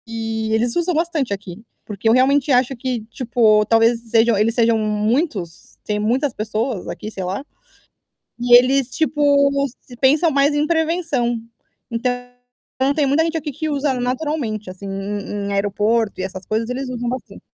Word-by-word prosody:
E 225 Hz, -1 st, -3 dB
eles 230 Hz, +2 st, +1 dB
usam 345 Hz, +1 st, +1 dB
bastante 315 Hz, -8 st, -1 dB
aqui, 195 Hz, 0 st, -8 dB, 0.2 s
porque 210 Hz, +1 st, -1 dB
eu -, -, +5 dB
realmente 275 Hz, +3 st, +3 dB
acho 255 Hz, +1 st, +3 dB
que, 250 Hz, -1 st, -3 dB
tipo, 225 Hz, -3 st, +2 dB
talvez 230 Hz, +1 st, +3 dB
sejam 225 Hz, -1 st, +4 dB
eles 220 Hz, +3 st, +1 dB
sejam 230 Hz, -1 st, +3 dB
muitos, 215 Hz, -, -2 dB
têm 210 Hz, 0 st, -2 dB
muitas 250 Hz, +6 st, 0 dB
pessoas 215 Hz, 0 st, -3 dB
aqui, 215 Hz, -, -6 dB
sei 190 Hz, -, -5 dB
lá, 190 Hz, +10 st, -4 dB, 0.9 s
e 240 Hz, 0 st, +6 dB
eles, 255 Hz, +1 st, +4 dB
tipo, 285 Hz, -1 st, +2 dB, 0.3 s
se 245 Hz, -, -14 dB
pensam 295 Hz, +6 st, +3 dB
mais 280 Hz, +1 st, +3 dB
em 295 Hz, +1 st, +1 dB
prevenção. 320 Hz, -8 st, 0 dB, 0.5 s
Então, 235 Hz, +2 st, 0 dB, 0.8 s
tem 300 Hz, -, +2 dB
muita 285 Hz, +4 st, +3 dB
gente 325 Hz, 0 st, -1 dB
aqui 300 Hz, -1 st, -4 dB
que 310 Hz, +4 st, -4 dB
usa 285 Hz, -1 st, 0 dB
naturalmente, 250 Hz, -4 st, -2 dB
assim, 185 Hz, +2 st, -9 dB
em 200 Hz, +1 st, -4 dB
em 200 Hz, -, -2 dB
aeroporto 205 Hz, +2 st, 0 dB
e -, -, -2 dB
essas 190 Hz, 0 st, -6 dB
coisas, 225 Hz, +2 st, -2 dB
eles 255 Hz, +1 st, -3 dB
usam 245 Hz, -1 st, -3 dB
bastante. 255 Hz, +1 st, -7 dB
240 Hz, 165 wpm, -20 LUFS, 215-280 Hz, 0.9 s, e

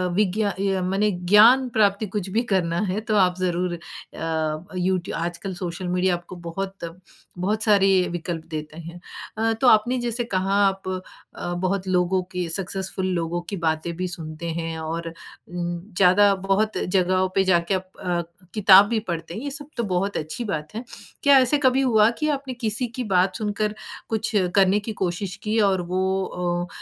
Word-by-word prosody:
विज्ञा 205 Hz, +1 st, +1 dB
अ, 195 Hz, 0 st, -1 dB
माने 195 Hz, +3 st, +1 dB
ज्ञान 210 Hz, +8 st, +5 dB
प्राप्ति 210 Hz, -2 st, +2 dB
कुछ 195 Hz, -1 st, -4 dB
भी 220 Hz, +4 st, +1 dB
करना 175 Hz, -2 st, +1 dB
है 190 Hz, +3 st, -1 dB
तो 215 Hz, -, +2 dB
आप 180 Hz, -2 st, +4 dB
ज़रूर 180 Hz, -1 st, 0 dB
अ, 160 Hz, -1 st, -4 dB
यूट्यू 185 Hz, 0 st, -1 dB
आजकल 175 Hz, +3 st, -4 dB
सोशल 180 Hz, 0 st, -5 dB
मीडिया 180 Hz, +1 st, +1 dB
आपको 175 Hz, +2 st, -9 dB
बहुत, 180 Hz, +3 st, -5 dB, 0.6 s
बहुत 210 Hz, +4 st, -1 dB
सारे 195 Hz, -3 st, +4 dB
विकल्प 170 Hz, -1 st, -4 dB
देते 155 Hz, 0 st, -6 dB
हैं। 170 Hz, +1 st, -9 dB, 0.4 s
अ, 225 Hz, +1 st, +1 dB
तो 260 Hz, -, +4 dB
आपने 240 Hz, +3 st, +4 dB
जैसे 240 Hz, 0 st, -2 dB
कहा 190 Hz, +1 st, +1 dB
आप 195 Hz, -1 st, -3 dB, 0.5 s
अ, 175 Hz, -, -4 dB
बहुत 185 Hz, +2 st, -1 dB
लोगों 185 Hz, 0 st, +2 dB
के 180 Hz, -1 st, -2 dB
सक्सेसफुल 190 Hz, +1 st, -3 dB
लोगों 170 Hz, 0 st, -2 dB
की 200 Hz, -, -3 dB
बातें 160 Hz, +1 st, -1 dB
भी 185 Hz, 0 st, -2 dB
सुनते 165 Hz, -1 st, -6 dB
हैं 165 Hz, -1 st, -4 dB
और 165 Hz, +1 st, -4 dB
उम, 175 Hz, +1 st, -7 dB, 0.2 s
ज़्यादा 195 Hz, +2 st, +5 dB
बहुत 210 Hz, +3 st, +1 dB
जगहों 185 Hz, 0 st, +1 dB
पे 195 Hz, -, +4 dB
जाके 175 Hz, 0 st, +2 dB
आप 185 Hz, 0 st, -2 dB
अ, 175 Hz, -1 st, 0 dB, 0.3 s
किताब 200 Hz, -2 st, +7 dB
भी 230 Hz, -, +1 dB
पढ़ते 165 Hz, 0 st, -4 dB
हैं 215 Hz, -, -5 dB
ये 285 Hz, -, -3 dB
सब 290 Hz, +1 st, -8 dB
तो 235 Hz, -, 0 dB
बहुत 195 Hz, +3 st, 0 dB
अच्छी 155 Hz, +10 st, -4 dB
बात 155 Hz, -1 st, -4 dB
है। 230 Hz, -, -4 dB, 0.4 s
क्या 280 Hz, -1 st, +7 dB
ऐसे 260 Hz, +3 st, +3 dB
कभी 265 Hz, -1 st, +3 dB
हुआ 220 Hz, -4 st, +4 dB
कि 305 Hz, -, 0 dB
आपने 270 Hz, -2 st, -7 dB
किसी 240 Hz, 0 st, -2 dB
की -, -, 0 dB
बात 185 Hz, +1 st, +3 dB
सुनकर 210 Hz, 0 st, -2 dB, 0.3 s
कुछ 220 Hz, -1 st, -1 dB, 0.2 s
करने 195 Hz, +1 st, +4 dB
की 215 Hz, +2 st, -5 dB
कोशिश 185 Hz, +1 st, -3 dB
की 220 Hz, +1 st, 0 dB
और 190 Hz, -1 st, 0 dB
वो 190 Hz, +1 st, 0 dB
अ, 175 Hz, -1 st, -2 dB
185 Hz, 175 wpm, -23 LUFS, 175-210 Hz, 0.6 s, किताब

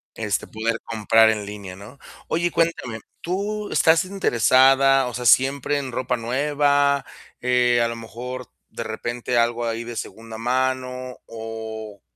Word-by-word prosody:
Este, 105 Hz, -3 st, -2 dB
poder 115 Hz, +1 st, -2 dB
comprar 110 Hz, 0 st, +4 dB
en 105 Hz, -2 st, -1 dB
línea, 100 Hz, -2 st, -8 dB
¿no?, 105 Hz, +8 st, -12 dB, 0.3 s
oye 170 Hz, +2 st, +1 dB
y -, -, -1 dB
cuéntame, 160 Hz, -10 st, -1 dB, 0.2 s
¿tú 205 Hz, +4 st, -3 dB
estás 165 Hz, 0 st, +4 dB
interesada? 135 Hz, -, +4 dB
O 125 Hz, -, -5 dB
sea, 125 Hz, +1 st, -4 dB
¿siempre 135 Hz, +3 st, +3 dB
en 135 Hz, -2 st, -4 dB
ropa 125 Hz, 0 st, -1 dB
nueva?, 140 Hz, +3 st, +1 dB, 0.3 s
Eh, 125 Hz, -1 st, +3 dB
a 115 Hz, -, +2 dB
lo 115 Hz, -, -4 dB
mejor, 125 Hz, +2 st, -7 dB, 0.2 s
de -, -, -6 dB
repente 120 Hz, +2 st, -3 dB
algo 120 Hz, 0 st, +1 dB
ahí 115 Hz, 0 st, -2 dB
de 120 Hz, 0 st, -7 dB
segunda 115 Hz, 0 st, -7 dB
mano, 130 Hz, +1 st, -2 dB
o 110 Hz, -2 st, -7 dB
125 Hz, 150 wpm, -23 LUFS, 115-135 Hz, 0.3 s, comprar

